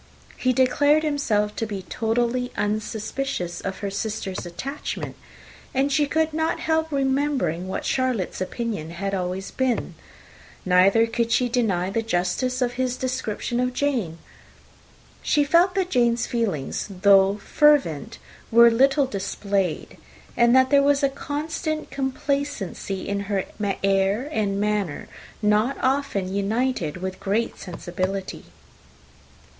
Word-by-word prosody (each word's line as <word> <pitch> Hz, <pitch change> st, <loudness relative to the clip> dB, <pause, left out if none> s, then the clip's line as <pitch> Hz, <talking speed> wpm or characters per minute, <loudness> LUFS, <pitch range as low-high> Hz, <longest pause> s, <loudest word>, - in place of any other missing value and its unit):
He 255 Hz, -, +1 dB
declared 285 Hz, +4 st, +3 dB
himself 215 Hz, -9 st, 0 dB
to 225 Hz, -, -1 dB
have -, -, -10 dB
been 195 Hz, -3 st, -4 dB
totally 240 Hz, +4 st, -1 dB
unsuspicious 210 Hz, -2 st, -2 dB
of 190 Hz, -1 st, -5 dB
her 200 Hz, -1 st, -3 dB
sister's 200 Hz, -3 st, -4 dB
attachment; 270 Hz, +12 st, -5 dB, 0.6 s
and 275 Hz, +2 st, +2 dB
she 290 Hz, +1 st, +2 dB
could 315 Hz, +1 st, 0 dB
not 320 Hz, +1 st, 0 dB
help 320 Hz, 0 st, 0 dB
remembering 270 Hz, -, 0 dB
what 190 Hz, -, -4 dB
Charlotte's 255 Hz, -9 st, -1 dB
opinion 205 Hz, -5 st, -3 dB
had 195 Hz, +4 st, -4 dB
always 185 Hz, +1 st, -3 dB
been. 260 Hz, -3 st, -1 dB, 0.7 s
Neither 190 Hz, +5 st, +5 dB
could 230 Hz, 0 st, -1 dB
she 245 Hz, +2 st, +3 dB
deny 195 Hz, -7 st, 0 dB
the 225 Hz, -, 0 dB
justice 225 Hz, +6 st, 0 dB
of 245 Hz, -1 st, -1 dB
his 255 Hz, 0 st, -1 dB
description 250 Hz, -2 st, -2 dB
of 250 Hz, 0 st, 0 dB
Jane. 240 Hz, -, -1 dB, 1.0 s
She 295 Hz, -, +2 dB
felt 340 Hz, +5 st, +3 dB
that 375 Hz, -2 st, 0 dB
Jane's 240 Hz, -1 st, +2 dB
feelings, 205 Hz, -, -2 dB, 0.2 s
though 195 Hz, 0 st, +6 dB
fervent, 230 Hz, -, +2 dB, 0.3 s
were 235 Hz, +1 st, +8 dB
little 270 Hz, +4 st, +4 dB
displayed, 200 Hz, -5 st, -2 dB, 0.4 s
and 235 Hz, +1 st, +4 dB
that 260 Hz, +1 st, +4 dB
there 280 Hz, -1 st, +6 dB
was 285 Hz, 0 st, +3 dB
a 275 Hz, -, +4 dB
constant 310 Hz, +3 st, -4 dB
complacency 265 Hz, -8 st, -3 dB
in 200 Hz, 0 st, -1 dB
her 195 Hz, -2 st, 0 dB, 0.4 s
air 195 Hz, +5 st, +2 dB
and 200 Hz, -6 st, 0 dB
manner, 205 Hz, -6 st, -1 dB, 0.4 s
not 210 Hz, +6 st, +2 dB
often 260 Hz, -9 st, 0 dB
united 200 Hz, -, -1 dB
with 185 Hz, +1 st, -5 dB
great 215 Hz, +4 st, -1 dB
sensibility. 185 Hz, +2 st, -4 dB
230 Hz, 130 wpm, -24 LUFS, 195-270 Hz, 1.0 s, were